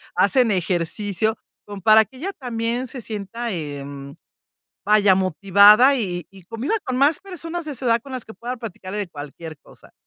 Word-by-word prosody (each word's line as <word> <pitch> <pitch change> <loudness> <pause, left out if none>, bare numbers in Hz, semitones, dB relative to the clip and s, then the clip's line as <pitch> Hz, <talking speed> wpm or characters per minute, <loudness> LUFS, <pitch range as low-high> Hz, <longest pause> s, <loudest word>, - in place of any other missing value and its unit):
Hacen 255 -4 +3
ejercicio, 195 +4 -1 0.3
como 205 -1 -9
para 215 +3 +6
que 260 - -18
ella 375 +9 -4
también 240 -1 -3
se 250 +1 -7
sienta, 225 +2 -5
em, 140 -4 -7 0.7
vaya, 205 -2 +5
motivada, 200 - +5
y 180 -7 -3
y 195 -1 -16
conviva 230 - -3
con 255 -1 -3
más 290 +3 +3
personas 345 -3 -6
de 300 -3 -6
su 255 - -5
edad 230 -1 +3
con 275 - -12
las 255 -3 -5
que 220 - -11
pueda 245 +3 -6
platicarle 205 -3 -7
de 205 -2 -3
cualquier 155 0 -9
cosa. - - -19
215 Hz, 175 wpm, -22 LUFS, 185-250 Hz, 0.7 s, para